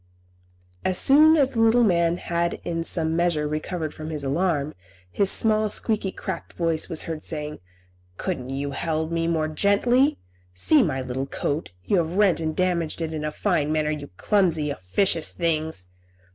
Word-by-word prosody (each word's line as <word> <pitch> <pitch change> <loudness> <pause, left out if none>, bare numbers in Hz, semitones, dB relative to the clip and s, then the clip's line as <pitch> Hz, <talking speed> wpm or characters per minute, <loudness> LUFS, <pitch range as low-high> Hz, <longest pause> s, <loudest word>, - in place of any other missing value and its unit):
As 185 -1 +1
soon 310 +7 +6
as 275 -3 +3
the 230 - -3
little 225 +2 +5
man 170 -4 +2
had 170 -1 -1
in 165 -1 -2
some 160 -1 0
measure 170 -3 +1
recovered 155 +1 -4
from 155 0 -7
his 150 -3 -4
alarm, 150 0 0 0.4
his 200 - +2
small, 215 0 +3
squeaky, 210 -2 0
cracked - - -6
voice 165 -2 -1
was 160 - 0
heard 160 -2 -5
saying, 150 -1 -4 0.6
"Couldn't 125 0 -4
you 140 +1 -3
have - - -5
held 160 0 -2
me 165 0 0
more 160 -2 0
gently? 240 - +2 0.4
See 285 - +4
my 145 - 0
little 130 +2 -4
coat; 145 +3 -3
you 200 - +1
have 165 -1 0
rent 200 -5 +3
and 155 -1 -2
damaged 175 -4 -1
it 160 -1 -3
in 155 -1 -4
a 150 - -2
fine 155 -5 0
manner, 155 -1 0
you 150 -2 -5
clumsy, 165 -8 +1
officious 155 - 0
things!" 160 - -1
165 Hz, 175 wpm, -24 LUFS, 155-190 Hz, 0.6 s, soon